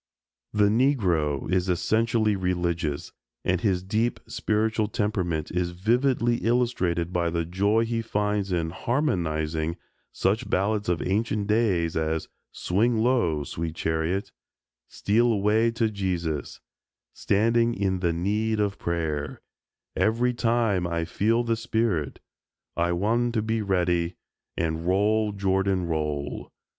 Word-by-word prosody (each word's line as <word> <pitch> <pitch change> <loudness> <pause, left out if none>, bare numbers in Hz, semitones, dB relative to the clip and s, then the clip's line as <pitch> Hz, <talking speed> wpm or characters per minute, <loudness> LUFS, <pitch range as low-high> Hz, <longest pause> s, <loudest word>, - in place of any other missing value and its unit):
The 105 -1 +2
Negro 95 - +1
is 95 0 +1
essentially 110 +4 +1
religious, 85 -5 -2 0.3
and 90 -1 +1
his 90 -3 +1
deep 110 +5 0
spiritual 110 0 0
temperament 90 -7 -1
is 90 0 0
vividly 120 +5 +1
illustrated 100 -9 0
by 85 -1 +1
the 85 0 -1
joy 100 +6 +1
he 115 0 -1
finds 105 -3 -1
in 85 -2 0
"harmonizing" 80 - -1 0.3
such 105 +4 0
ballads 100 +1 0
of 90 - 0
ancient 105 +1 0
days 100 -6 +1
as 80 0 -1 0.2
"Swing 110 +6 +1
Low, 110 - +2
Sweet 80 +3 -4
Chariot," 80 +5 -1 0.6
"Steal 115 +4 +2
Away 110 +2 +2
to 115 0 0
Jesus," 90 -6 -3 0.5
"Standin' 115 +3 +2
in 95 -2 0
the 85 -2 +1
Need 105 +6 0
of 100 -1 -1
Prayer," 80 -4 -3 0.5
"Every 115 +6 +2
Time 115 -6 +1
I 85 -1 -1
Feel 110 +7 +1
the 115 -1 0
Spirit," 110 -9 -1 0.6
"I 85 +1 +1
Wan' 115 +7 +1
to 110 -2 0
be 110 0 -1
Ready," 90 -3 0 0.4
and 80 0 -2
"Roll, 105 +3 +2
Jordan, 95 -1 0
Roll." 75 -3 -3
100 Hz, 125 wpm, -26 LUFS, 85-110 Hz, 0.6 s, The